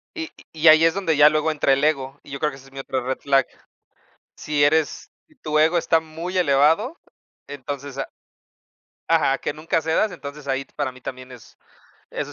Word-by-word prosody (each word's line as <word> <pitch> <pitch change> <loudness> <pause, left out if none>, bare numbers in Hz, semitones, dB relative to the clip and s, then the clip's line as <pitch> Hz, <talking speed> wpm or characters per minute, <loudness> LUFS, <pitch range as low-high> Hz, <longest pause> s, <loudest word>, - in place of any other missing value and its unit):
Y 325 0 -5 0.2
y 160 +1 +1
ahí 155 +1 +8
es 165 - +3
donde 185 -5 0
ya 150 0 +8
luego 155 +1 +1
entra 145 -2 +2
el 140 - 0
ego, 140 -2 0
y 140 - -14
yo 140 - -5
creo 150 -1 0
que 135 - -11
esa 135 0 -16
es - - -19
mi 135 - -8
otra 130 -1 -3
red 130 +1 -3
flag. 135 -1 +2 0.9
Si 150 -1 -1
eres 155 +1 +1 0.2
si 310 - -26
tu 155 - -2
ego 160 +3 +4
está 165 -1 +2
muy 165 +4 -6
elevado, 165 - +2 0.5
entonces 140 0 -7
a 135 - -3 1.0
Ajá, 145 -4 +3
que - - -3
nunca 160 +1 -1
cedas, 165 +6 +1
entonces, 145 -3 -9
ahí 135 0 -1
t - - -33
para 145 -3 -2
mí 130 0 -16
también 130 0 -8
es 125 -3 -15 0.5
eso - - -5
150 Hz, 205 wpm, -22 LUFS, 135-160 Hz, 1.0 s, ahí